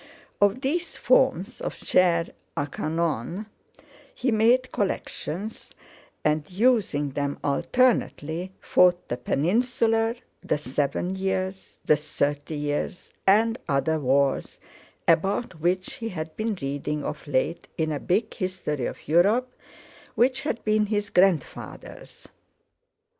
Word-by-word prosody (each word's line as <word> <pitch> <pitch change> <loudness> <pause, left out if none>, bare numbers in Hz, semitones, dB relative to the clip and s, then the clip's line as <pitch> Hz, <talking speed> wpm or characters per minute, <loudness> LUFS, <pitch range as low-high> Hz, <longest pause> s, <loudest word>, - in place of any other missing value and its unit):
Of 205 +5 +3
these 320 +5 -2
forms 255 -6 +2
of - - -3
"chair 170 -2 +3 0.3
a 145 - +1
canon" 165 - -2 0.7
he 255 - 0
made 240 +4 +3
collections, 200 0 -3 0.5
and, 150 0 +1
using 190 - +2
them 140 +1 -2
alternately, 175 - +1
fought 180 -1 +3
the 120 - -1
Peninsular, 225 - +1 0.3
the - - 0
Seven 145 +6 -1
Years, 190 0 -3
the 150 - +5
Thirty 145 0 -2
Years, 145 +4 -3 0.2
and 225 +4 +4
other 155 +3 +1
wars, 135 0 +1 0.5
about 180 +3 +1
which 185 +7 0
he 230 -3 -4
had 160 -4 -6
been 215 -2 -2
reading 145 +2 -2
of 150 - -5
late 145 +4 -1
in 160 -1 0
a 145 - -2
big 200 +9 0
History 185 -8 -2
of - - -9
Europe 210 +11 +3 0.6
which 255 +2 +3
had 265 -6 -3
been 215 0 +3
his 205 -1 -1
grandfather's. 180 -6 -1
180 Hz, 115 wpm, -26 LUFS, 150-220 Hz, 0.7 s, the